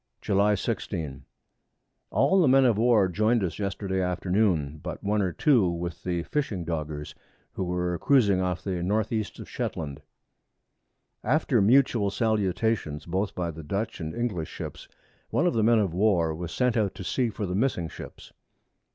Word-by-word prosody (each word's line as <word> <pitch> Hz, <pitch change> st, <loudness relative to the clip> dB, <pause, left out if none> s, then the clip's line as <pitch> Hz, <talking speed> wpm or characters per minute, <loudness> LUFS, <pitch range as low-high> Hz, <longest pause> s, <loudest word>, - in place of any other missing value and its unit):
July 105 Hz, +1 st, +2 dB
16. 80 Hz, -, -4 dB, 0.8 s
All 190 Hz, 0 st, +3 dB
the 160 Hz, -, +4 dB
Men 135 Hz, +1 st, +5 dB
of 120 Hz, -4 st, +4 dB
War 115 Hz, -4 st, +4 dB
join'd 110 Hz, +5 st, +1 dB
us 85 Hz, -1 st, -3 dB
Yesterday 100 Hz, -1 st, -2 dB
Afternoon, 90 Hz, -4 st, 0 dB
but -, -, -6 dB
one 105 Hz, +1 st, +1 dB
or 95 Hz, -2 st, 0 dB
two 120 Hz, -, +3 dB
with 85 Hz, 0 st, -4 dB
the 85 Hz, -2 st, -2 dB
fishing 105 Hz, -, -2 dB
Doggers, 75 Hz, -2 st, -4 dB, 0.4 s
who 95 Hz, -, -3 dB
were 90 Hz, -1 st, -1 dB
cruizing 105 Hz, -9 st, +3 dB
off 90 Hz, -2 st, -2 dB
to 100 Hz, -, -3 dB
the 90 Hz, -2 st, -2 dB
North 105 Hz, +4 st, 0 dB
East 110 Hz, -2 st, -2 dB
of -, -, -9 dB
Shetland. 75 Hz, -2 st, -4 dB, 1.2 s
After -, -, +2 dB
mutual 115 Hz, -1 st, +4 dB
Salutations 105 Hz, -6 st, 0 dB
both 95 Hz, +4 st, -2 dB
by 85 Hz, -2 st, -2 dB
the 80 Hz, 0 st, -9 dB
Dutch 100 Hz, +9 st, -3 dB
and 80 Hz, -1 st, -5 dB
English 105 Hz, -10 st, -2 dB
Ships, -, -, -8 dB, 0.4 s
one 175 Hz, -, +1 dB
of 175 Hz, -, +2 dB
the 115 Hz, -, +1 dB
Men 115 Hz, +2 st, +4 dB
of 100 Hz, -6 st, +1 dB
War 90 Hz, -4 st, +2 dB
was 85 Hz, +1 st, -6 dB
sent 125 Hz, +6 st, +1 dB
out 105 Hz, -4 st, 0 dB
to -, -, -7 dB
see 125 Hz, +6 st, 0 dB
for 105 Hz, -1 st, -4 dB
the 90 Hz, -, -3 dB
missing 100 Hz, -5 st, 0 dB
Ships. -, -, -11 dB
95 Hz, 170 wpm, -27 LUFS, 85-110 Hz, 1.2 s, Men